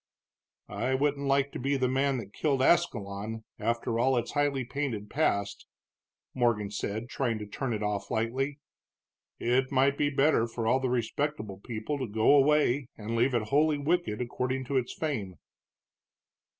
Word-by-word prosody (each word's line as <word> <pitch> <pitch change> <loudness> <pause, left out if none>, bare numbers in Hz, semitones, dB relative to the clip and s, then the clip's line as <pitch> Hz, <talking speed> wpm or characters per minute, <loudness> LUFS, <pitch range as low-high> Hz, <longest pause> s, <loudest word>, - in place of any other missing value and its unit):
"I 130 +1 -1
wouldn't 140 +1 0
like 140 0 +2
to - - -6
be 140 +2 0
the 130 -1 +1
man 135 +1 +1
that 105 -4 -7
killed 140 -4 +1
Ascalon, 110 -9 +1 0.2
after 115 0 -1
all 130 +1 +3
its 120 - -2
highly 145 -3 0
painted 120 -6 -3
past," 100 -10 0 0.7
Morgan 115 -5 +1
said, 105 +3 -3
trying 125 -4 -1
to 105 - -6
turn 120 +5 -4
it 110 -2 -2
off 105 -1 -2
lightly. 130 +6 -1 0.8
"It 130 +2 +1
might 140 +1 +3
be 145 - +3
better 140 -4 +3
for 115 0 -4
all 125 +4 +3
the 130 -1 -1
respectable 120 -3 -2
people 115 +6 -4
to 130 - -2
go 110 +6 +4
away 145 -2 +3
and 110 +2 -4
leave 120 +2 +2
it 110 -2 -1
wholly 150 +2 +3
wicked, 145 -7 0
according 130 +2 -2
to 135 +2 0
its 125 -1 -1
fame." 115 - -3
130 Hz, 165 wpm, -29 LUFS, 110-140 Hz, 0.8 s, go